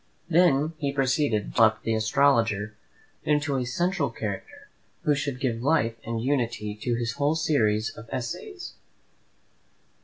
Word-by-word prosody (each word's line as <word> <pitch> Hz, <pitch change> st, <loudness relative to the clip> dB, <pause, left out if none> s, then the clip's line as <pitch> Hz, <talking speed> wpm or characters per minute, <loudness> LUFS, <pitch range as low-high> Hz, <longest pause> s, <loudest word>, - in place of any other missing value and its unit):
Then 165 Hz, -3 st, +3 dB
he 140 Hz, -2 st, -1 dB
proceeded 135 Hz, -4 st, +1 dB
to -, -, -8 dB
develop 110 Hz, -1 st, +3 dB
the 115 Hz, -, 0 dB
astrologer 110 Hz, -2 st, +2 dB, 0.5 s
into 150 Hz, -1 st, +1 dB
a 130 Hz, -2 st, 0 dB
central 175 Hz, +2 st, 0 dB
character, 105 Hz, -4 st, -6 dB, 0.4 s
who 150 Hz, -, +3 dB
should 140 Hz, -3 st, -2 dB
give 120 Hz, -4 st, -1 dB
life 130 Hz, -5 st, +2 dB
and 115 Hz, 0 st, -3 dB
unity 120 Hz, -5 st, -1 dB
to 120 Hz, 0 st, 0 dB
his 120 Hz, 0 st, -1 dB
whole 145 Hz, +2 st, +1 dB
series 115 Hz, -9 st, +1 dB
of 115 Hz, 0 st, -11 dB
essays. 360 Hz, -, -5 dB
125 Hz, 140 wpm, -26 LUFS, 115-145 Hz, 0.5 s, Then